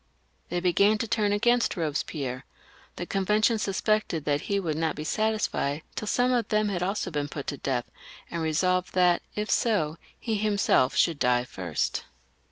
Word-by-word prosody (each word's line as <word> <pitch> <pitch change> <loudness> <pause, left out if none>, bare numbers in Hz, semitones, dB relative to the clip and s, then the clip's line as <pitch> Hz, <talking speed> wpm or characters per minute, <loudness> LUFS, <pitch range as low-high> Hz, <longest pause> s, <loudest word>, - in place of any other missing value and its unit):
They 175 - -1
began 200 +4 +3
to 230 - -2
turn 215 -2 +1
against 240 +4 +2
Kobespierre; 145 -5 -3 0.5
the 175 - -4
Con 195 +2 -1
vention 215 +3 +3
suspected 200 -5 0
that 145 -1 +1
he 200 -1 +2
would 165 -5 -2
not 160 -1 -1
be 150 - -5
satisfied 210 -7 -1
till 215 - -5
some 245 +3 +2
of 240 -4 +1
them 215 -1 +1
had 180 -3 -2
also 190 0 -1
been 145 -2 -2
put 145 -1 -6
to - - -7
death, 125 -3 -1 0.5
and 170 - -3
resolved 180 +4 0
that 180 -1 +4
if 210 0 -2
so, 165 -9 +1 0.2
he 225 -3 -1
himself 200 -10 +2
should 165 -4 +2
die 125 0 +3
first. 90 -10 -3
180 Hz, 175 wpm, -27 LUFS, 150-215 Hz, 0.5 s, that